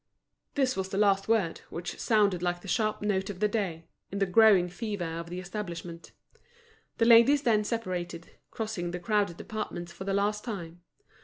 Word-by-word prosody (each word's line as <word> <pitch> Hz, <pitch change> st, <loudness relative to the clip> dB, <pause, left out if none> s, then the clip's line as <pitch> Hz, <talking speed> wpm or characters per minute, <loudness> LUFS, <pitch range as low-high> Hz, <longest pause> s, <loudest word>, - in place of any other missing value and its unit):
This 265 Hz, -2 st, +2 dB
was 190 Hz, 0 st, -3 dB
the 195 Hz, -, -3 dB
last 200 Hz, -1 st, +3 dB
word, 215 Hz, -7 st, +1 dB
which 170 Hz, +1 st, -6 dB
sounded 205 Hz, -5 st, +2 dB
like 175 Hz, 0 st, -1 dB
the 195 Hz, -, -11 dB
sharp 215 Hz, +2 st, 0 dB
note 195 Hz, -2 st, 0 dB
of 190 Hz, -3 st, -6 dB
the 210 Hz, -, +3 dB
day, 190 Hz, -7 st, -2 dB, 0.3 s
in 200 Hz, -, -4 dB
the 200 Hz, -, +2 dB
growing 195 Hz, -1 st, +5 dB
fever 200 Hz, 0 st, -4 dB
of 165 Hz, +1 st, -5 dB
the 180 Hz, +1 st, -5 dB
establishment. 175 Hz, -3 st, -7 dB, 0.9 s
The 230 Hz, -, +3 dB
ladies 235 Hz, +5 st, +7 dB
then 215 Hz, -4 st, +3 dB
separated, 180 Hz, -7 st, -4 dB, 0.2 s
crossing 215 Hz, -6 st, -4 dB
the 180 Hz, +1 st, -4 dB
crowded 200 Hz, -1 st, 0 dB
departments 210 Hz, -6 st, -5 dB
for 190 Hz, +2 st, -8 dB
the 195 Hz, 0 st, 0 dB
last 210 Hz, +1 st, 0 dB
time. 175 Hz, -7 st, -6 dB
195 Hz, 175 wpm, -29 LUFS, 175-215 Hz, 0.9 s, ladies